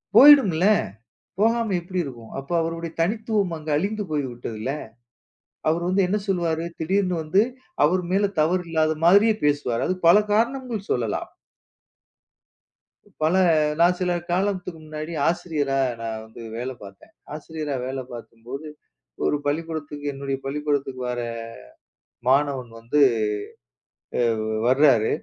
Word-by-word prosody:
போய்விடும் 280 -7 +9
இல்லையா? 200 +6 +4 0.6
போகாமல் 225 -3 +2
எப்படி 180 +1 -5
இருக்கும்? 120 -5 -9
அப்போது 155 +6 -1
அவருடைய 165 0 -4
தனித்துவம் 210 0 0
அங்கே 155 0 -6
அழிந்து 205 +6 -1
போய்விட்டது 125 -6 -3
இல்லையா? 135 +6 -3 0.8
அவர் 170 +2 +1
வந்து 190 +1 +3
என்ன 205 +3 0
சொல்லுவார்? 165 -3 0 0.2
திடீர் 190 +5 +1
என்று 180 -1 -1
வந்து 185 +7 +3 0.4
அவர் 180 +5 +3
மேல் 200 +1 +3
தவறு 180 +4 +2
இல்லாத 160 -1 +2
மாதிரியே 205 +5 +6
பேசுவார். 145 -5 +1
அதற்கு 185 -2 -1
பல 190 +5 +8
காரணங்கள் 235 -1 -1
சொல்லலாம். 115 -4 -1 1.9
பல 160 +4 +3 0.4
நான் 175 +1 +4
சில 180 -1 0 0.2
காலத்துக்கு 185 -3 -1
முன்னாடி 155 +1 -6 0.2
ஆசிரியராக 140 -6 0
நான் 110 -1 -4
வந்து 110 +1 -13
வேலை 125 +2 -4
பார்த்தேன். 100 -1 -14 0.2
ஆசிரியராக 150 -3 -4
வேலை 130 0 -4
பார்க்கும்போது 120 +5 -8 0.6
ஒரு 150 - +2
பள்ளிக்கூடத்துக்கு 150 -1 -3
என்னுடைய 135 0 -3
பள்ளிக்கூடத்துக்கு 140 -2 -2
வருகிற 120 -1 -3 0.9
மாணவன் 135 -3 +1
வந்து 120 +6 0 1.5
அ 110 - -3 0.2
வருகிறார். 130 -4 +5
155 Hz, 120 wpm, -24 LUFS, 135-185 Hz, 1.9 s, போய்விடும்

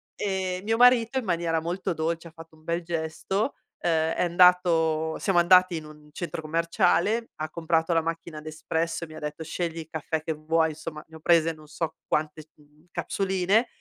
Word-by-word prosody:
E 190 -2 -2
mio 225 +1 +1
marito 245 0 +5
in 255 - -1
maniera 170 -3 0
molto 175 +2 -2
dolce 165 +1 -2
ha - - -13
fatto 165 -1 -14
un 155 - -22
bel 170 +1 -2
gesto, 170 - -2 0.2
ehm, 160 -1 +1
è - - 0
andato 170 -3 +4
siamo 190 -4 +2
andati 180 0 +5
in 155 - -7
un 150 0 -14
centro 170 +1 -5
commerciale, 170 +7 +1
ha 155 0 -4
comprato 165 0 0
la 165 - +3
macchina 165 -1 -5
Nespresso 160 +2 -3
e - - -5
mi 155 - -12
ha - - -7
detto: 150 +2 -5
"Scegli 165 +1 -3
il 160 - -7
caffè 160 0 -3
che 160 0 -2
vuoi." 160 +1 +1
Insomma, 155 0 -7
ne 160 - -15
ho - - -10
prese 165 0 +3
non 155 -1 -16
so 160 +1 -4
quante, 155 0 -1
mhmm, 150 +2 -25
capsuline 195 +4 +1
165 Hz, 190 wpm, -26 LUFS, 160-180 Hz, 0.2 s, marito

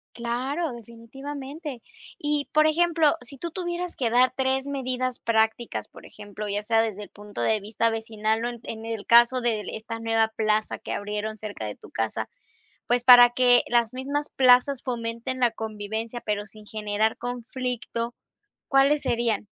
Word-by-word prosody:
Claro, 260 +7 -2
definitivamente. 265 +4 -8 0.4
Y 295 -1 -1
por 305 +1 +5
ejemplo, 330 -1 +3
si 250 +3 -11
tú 340 +6 -5
tuvieras 350 0 -4
que 240 -4 0
dar 250 +2 +4
3 265 +1 0
medidas 255 -2 -2
prácticas, 225 +1 0
por - - -14
ejemplo, 210 +1 -8
ya 205 +1 -1
sea 225 +1 +3
desde 210 -2 -3
el 205 - -9
punto 205 -10 -7
de 215 - +2
vista 225 +3 0
vecinal 220 0 -1
o - - 0
en 240 -1 -7
en 220 0 -7
el 225 -3 -5
caso 240 +2 +6
de 230 -3 0
esta 220 +1 -6
nueva 225 -1 +1
plaza 215 -1 0
que - - -6
abrieron 210 +1 -3
cerca 210 - -6
de 105 - -5
tu - - -16
casa, 110 -1 -2 0.6
pues 245 0 +2
para 245 -1 +10
que 245 0 +5
las 235 -1 +2
mismas 285 +3 -3
plazas 255 +1 +4
fomenten 235 +1 -3
la 245 -2 +4
convivencia 220 +1 -5
pero 210 -1 -2
sin 215 -1 -13
generar 215 +1 -1
conflicto, 245 -1 -3 0.5
¿cuáles 280 +1 +4
serían? 230 -3 0
235 Hz, 160 wpm, -25 LUFS, 220-260 Hz, 0.6 s, para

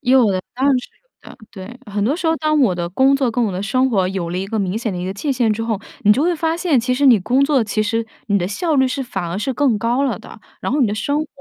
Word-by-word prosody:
有 255 -5 +4
的， 185 - -1
当 260 +3 0
然 275 -2 +4
是 250 - -9 0.4
有 - - -11
的， - - -17
对。 200 +5 -10
很 205 0 0
多 260 +7 +1
时 345 - -3
候， 320 0 +2
当 305 -1 +1
我 205 -9 +3
的 175 -1 -3
工 265 +9 +3
作 265 -4 0
跟 245 +1 0
我 205 - -1
的 185 +2 -3
生 255 +6 +1
活 190 -5 +2
有 180 -3 -3
了 180 - -2
一 195 - -3
个 220 +1 -3
明 190 0 -1
显 225 -3 -3
的 180 - -4
一 180 - -4
个 190 - -3
界 275 +7 -2
限 240 -4 +1
之 225 +2 -3
后， 220 -3 -2 0.2
你 210 -2 +6
就 270 - +1
会 350 +1 +2
发 325 +1 -1
现， 340 -6 +2
其 250 +2 -1
实 280 +2 +2
你 235 -5 +7
工 260 +8 +2
作 275 -5 +2
其 215 0 -1
实 225 +1 -1 0.2
你 200 -2 +2
的 175 - -1
效 315 - -1
率 265 -1 +4
是 270 +2 -3
反 205 -8 -4
而 185 - -3
是 265 +6 -2
更 250 -5 +2
高 240 +5 0
了 270 - -1
的， - - -13 0.2
然 - - -2
后 290 - +1
你 245 - +4
的 205 - -2
生 285 +8 -1
活 310 - -4
240 Hz, 340 characters per minute, -19 LUFS, 205-275 Hz, 0.4 s, 你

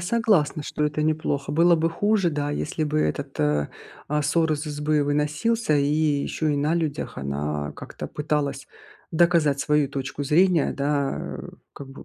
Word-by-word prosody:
согласна, 180 -7 +1
что 150 - -2
это 150 0 -1
неплохо. 150 -3 -1
Было 170 +3 +5
бы 165 0 +1
хуже, 205 0 +1
да, 145 -1 -2
если 155 +1 -2
бы 155 0 0
этот, 140 -2 -2
э, 75 -1 +1 0.4
а, 150 +1 0
сор 160 +2 +2
из 150 0 -3
избы 150 0 0
выносился, 150 +7 +1
и 140 - +2
еще 150 0 0
и - - 0
на 150 +3 +1
людях 155 -4 -3
она 75 +1 -3
как-то - - -8
пыталась 145 -2 -2 0.4
доказать 165 -4 +3
свою 150 0 +2
точку 135 0 -4
зрения, 165 +2 +3
да, 140 0 0
а, - - -6 0.2
как 140 - -10
бы 135 - -11
150 Hz, 165 wpm, -24 LUFS, 140-160 Hz, 0.4 s, Было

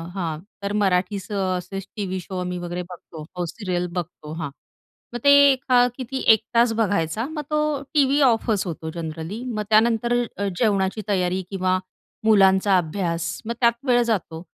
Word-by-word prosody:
हां 165 -5 -3 0.2
तर 200 +1 -2
मराठीच 195 0 0
असेच 190 0 -2
टीव्ही 190 -3 -3
शो 185 +1 -7
आम्ही 180 0 -3
वगैरे 175 +1 -4
बघतो. 165 -3 -10
हो, 175 -1 -2
सीरियल 180 -1 -3
बघतो 160 -3 -6
हा 145 - -3 0.6
मग 240 - -3
ते 280 - +7 0.2
एका 255 -1 +3
किती 265 +1 -5 0.2
1 220 - +2 0.2
तास 235 0 +5
बघायचा 205 -1 0
मग 310 -1 -4
तो 300 - +2 0.3
टीव्ही 285 -1 +3
ऑफच 225 -5 +2
होतो 160 -1 -5
जनरली. 165 +7 -5
मग 215 -4 -3
त्यानंतर 230 +2 +3 0.2
अ, 200 0 -1
जेवणाची 205 -2 +1
तयारी 185 -1 +1
किंवा 185 -1 +1 0.5
मुलांचा 195 -2 +5
अभ्यास. 170 0 -2
मग 235 - -2
त्यात 235 -1 +5
वेळ 245 -1 +4
जातो 180 -7 -2
195 Hz, 155 wpm, -23 LUFS, 180-225 Hz, 0.6 s, ते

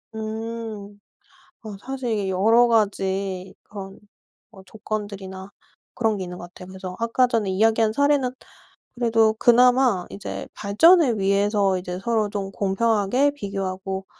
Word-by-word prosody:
음. 220 -2 -6 0.6
어 215 -3 -8
사실 260 0 -5
이게 205 -3 -1
여러 225 +6 +4
가지 195 -4 -1
그런 195 -2 -10 0.5
뭐 195 -4 -15
조건들이나 200 -2 -6 0.4
그런 225 -3 0
게 190 - -4
있는 180 0 -8
것 - - -8
같아요. 180 - -12
그래서 185 -1 -8
아까 230 +2 +2
전에 225 -5 -1
이야기한 220 +2 +2
사례는 285 -1 +2 0.7
그래도 225 -2 +2
그나마 245 -3 +4
이제 200 - -7
발전을 245 - +4
위해서 200 0 +2
이제 180 0 -5
서로 215 0 0
좀 195 -1 -4
공평하게 220 +7 +1
비교하고 195 -3 -4
210 Hz, 290 characters per minute, -23 LUFS, 195-230 Hz, 0.7 s, 여러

